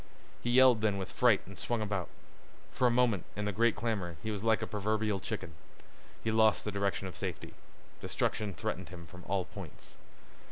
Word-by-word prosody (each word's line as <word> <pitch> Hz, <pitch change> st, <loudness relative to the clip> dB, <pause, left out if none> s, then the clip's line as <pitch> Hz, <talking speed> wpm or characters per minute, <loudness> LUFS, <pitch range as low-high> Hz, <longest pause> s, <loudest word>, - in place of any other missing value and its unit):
He 120 Hz, -, -2 dB
yelled 125 Hz, -2 st, +6 dB
then 105 Hz, -2 st, +2 dB
with 95 Hz, -1 st, -4 dB
fright 120 Hz, -5 st, +4 dB
and 95 Hz, -, -11 dB
swung 120 Hz, -1 st, -1 dB
about. 100 Hz, -4 st, -2 dB, 0.6 s
For 125 Hz, -, +3 dB
a -, -, +5 dB
moment, 120 Hz, -5 st, +3 dB
in 105 Hz, -, -2 dB
the 105 Hz, -, 0 dB
great 115 Hz, +3 st, +3 dB
clamor, 100 Hz, -8 st, -2 dB
he 110 Hz, -, -2 dB
was 105 Hz, -1 st, -4 dB
like 110 Hz, 0 st, +3 dB
a -, -, +1 dB
proverbial 105 Hz, -1 st, 0 dB
chicken. 95 Hz, -2 st, -5 dB, 0.7 s
He 110 Hz, -, +1 dB
lost 110 Hz, 0 st, +4 dB
the 105 Hz, -, -1 dB
direction 100 Hz, -1 st, -1 dB
of 90 Hz, -3 st, -6 dB
safety. -, -, -5 dB, 0.5 s
Destruction 105 Hz, -4 st, -1 dB
threatened -, -, -3 dB
him 85 Hz, -2 st, -9 dB
from 90 Hz, +2 st, -12 dB
all 95 Hz, -1 st, 0 dB
points. -, -, -11 dB
105 Hz, 190 wpm, -32 LUFS, 95-110 Hz, 0.7 s, yelled